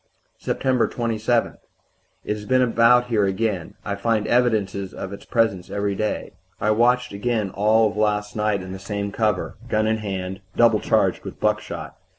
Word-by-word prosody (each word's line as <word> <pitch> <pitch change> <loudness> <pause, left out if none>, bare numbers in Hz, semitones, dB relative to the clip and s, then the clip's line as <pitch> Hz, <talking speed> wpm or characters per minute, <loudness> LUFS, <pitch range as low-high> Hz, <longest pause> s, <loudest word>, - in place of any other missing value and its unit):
"Sept. 130 -3 +1
27. 115 0 0 0.7
It - - 0
has 105 0 -8
been 130 +2 +3
about 120 +1 +4
here 110 -4 +1
again 95 -2 -2
I 100 - -2
find 105 +1 0
evidences 105 -6 +1
of 95 0 -6
its 100 - -10
presence 110 -6 0
every 100 0 -1
day. 105 +2 -2 0.3
I 105 - +2
watched 120 +1 +2
again 105 -1 -1
all 110 +2 +3
of - - -11
last 105 -1 0
night 105 -3 0
in 95 - -8
the 95 - -6
same 100 +1 -4
cover, 105 -3 -1
gun 110 0 +1
in 110 0 +1
hand, 95 -2 -4
double 115 -2 +5
charged - - +1
with - - -8
buckshot. - - -2
105 Hz, 165 wpm, -23 LUFS, 100-115 Hz, 0.7 s, double